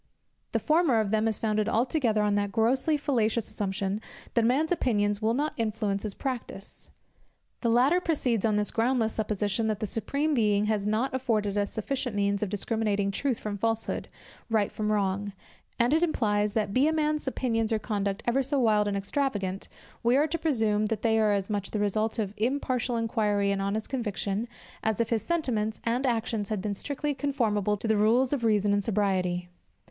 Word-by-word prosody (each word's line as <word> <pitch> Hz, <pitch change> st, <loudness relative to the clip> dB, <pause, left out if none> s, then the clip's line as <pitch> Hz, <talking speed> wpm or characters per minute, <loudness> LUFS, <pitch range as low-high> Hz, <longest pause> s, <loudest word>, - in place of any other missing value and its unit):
The -, -, +1 dB
former 310 Hz, -7 st, +3 dB
of 210 Hz, -2 st, 0 dB
them 220 Hz, 0 st, +2 dB
is 220 Hz, -, 0 dB
founded 215 Hz, -1 st, 0 dB
altogether 230 Hz, -2 st, +1 dB
on 205 Hz, -1 st, +2 dB
that 205 Hz, 0 st, 0 dB
grossly 255 Hz, +8 st, +2 dB
fallacious 235 Hz, -6 st, 0 dB
assumption, 195 Hz, 0 st, -2 dB, 0.3 s
that 235 Hz, -, +3 dB
a -, -, +4 dB
man's 295 Hz, +7 st, +1 dB
opinions 205 Hz, -10 st, +1 dB
will 225 Hz, +2 st, +1 dB
not 295 Hz, +3 st, -1 dB
influence 215 Hz, -3 st, -1 dB
his 210 Hz, -3 st, -5 dB
practice. 245 Hz, -7 st, -6 dB, 0.7 s
The 235 Hz, -, +1 dB
latter 260 Hz, +10 st, +4 dB
proceeds 255 Hz, -, 0 dB
on 215 Hz, -2 st, +2 dB
this 210 Hz, 0 st, 0 dB
groundless 230 Hz, -1 st, +1 dB
supposition, 210 Hz, 0 st, -1 dB
that 215 Hz, -2 st, -1 dB
the 215 Hz, -, -1 dB
Supreme 280 Hz, +8 st, -1 dB
Being 210 Hz, -5 st, +2 dB
has 210 Hz, -1 st, 0 dB
not 225 Hz, +6 st, 0 dB
afforded 220 Hz, -6 st, 0 dB
us 205 Hz, 0 st, 0 dB
sufficient 245 Hz, +1 st, -3 dB
means 200 Hz, 0 st, +1 dB
of 210 Hz, -, -1 dB
discriminating 205 Hz, -1 st, 0 dB
truth 255 Hz, +3 st, -1 dB
from 205 Hz, -1 st, -5 dB
falsehood, 225 Hz, +1 st, -1 dB, 0.4 s
right 215 Hz, -3 st, +1 dB
from 215 Hz, 0 st, -2 dB
wrong: 200 Hz, 0 st, 0 dB, 0.4 s
and 240 Hz, +4 st, +3 dB
it 320 Hz, -, +3 dB
implies, 210 Hz, -10 st, +1 dB
that 210 Hz, -2 st, -1 dB
be 265 Hz, +5 st, +4 dB
a -, -, +3 dB
man's 305 Hz, -2 st, 0 dB
opinions 230 Hz, -4 st, 0 dB
or 220 Hz, -, +3 dB
conduct 205 Hz, -2 st, -2 dB
ever 240 Hz, +3 st, +2 dB
so 275 Hz, +2 st, 0 dB
wild 215 Hz, -4 st, +3 dB
and 200 Hz, -1 st, -1 dB
extravagant, 200 Hz, -3 st, -2 dB, 0.3 s
we 240 Hz, +3 st, +3 dB
are 295 Hz, -, +4 dB
to 320 Hz, +2 st, -2 dB
presume, 220 Hz, -8 st, +1 dB
that 220 Hz, -1 st, -3 dB
they 225 Hz, -1 st, +3 dB
are 215 Hz, -1 st, +3 dB
as 195 Hz, -1 st, -1 dB
much 205 Hz, -2 st, -2 dB
the -, -, -3 dB
result 215 Hz, +2 st, 0 dB
of 205 Hz, -3 st, -2 dB
impartial 250 Hz, +1 st, 0 dB
inquiry 210 Hz, -3 st, +1 dB
and 195 Hz, 0 st, -1 dB
honest 200 Hz, +2 st, -2 dB
conviction, 215 Hz, -3 st, -2 dB, 0.3 s
as 220 Hz, 0 st, -1 dB
if 230 Hz, 0 st, 0 dB
his 225 Hz, -2 st, +2 dB
sentiments 235 Hz, -11 st, -1 dB
and 245 Hz, +3 st, 0 dB
actions 225 Hz, -3 st, -1 dB
had 215 Hz, -2 st, -1 dB
been 205 Hz, +2 st, -2 dB
strictly 290 Hz, +7 st, -2 dB
conformable 220 Hz, -8 st, 0 dB
to 225 Hz, -, -4 dB
the 220 Hz, -, +3 dB
rules 240 Hz, +6 st, +3 dB
of 265 Hz, -4 st, -1 dB
reason 210 Hz, -2 st, +3 dB
and 205 Hz, 0 st, +1 dB
sobriety. 185 Hz, -4 st, 0 dB
220 Hz, 190 wpm, -28 LUFS, 205-250 Hz, 0.7 s, a